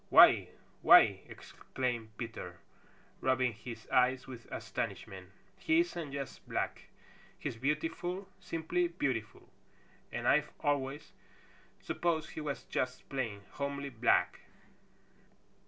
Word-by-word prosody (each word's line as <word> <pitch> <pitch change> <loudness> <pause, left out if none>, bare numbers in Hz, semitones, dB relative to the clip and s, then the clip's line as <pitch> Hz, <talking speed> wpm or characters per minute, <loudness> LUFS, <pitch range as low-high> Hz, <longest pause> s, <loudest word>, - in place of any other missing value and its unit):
"Why! - - +8 0.3
Why - - +10
ee!" - - -3
exclaimed 120 -4 -5
Peter, 110 -7 -6 0.6
rubbing 130 -2 +2
his 115 +1 -9
eyes 130 +1 +3
with 125 -3 -10
astonishment. 95 -1 -5 0.3
"He 320 +1 +4
isn't 170 - -4
just 140 -1 -6
black! - - -2 0.5
He's - - -4
beautiful, 165 - -2
simply 175 0 -1
beautiful, 130 - -3 0.6
and - - -2
I've 150 +1 +4
always 145 0 -1 0.7
supposed 165 -3 -1
he - - -6
was 145 -2 -3
just 130 0 -3
plain, 115 -7 -3
homely 140 0 -3
black." 120 0 +2
135 Hz, 105 wpm, -33 LUFS, 120-155 Hz, 0.7 s, Why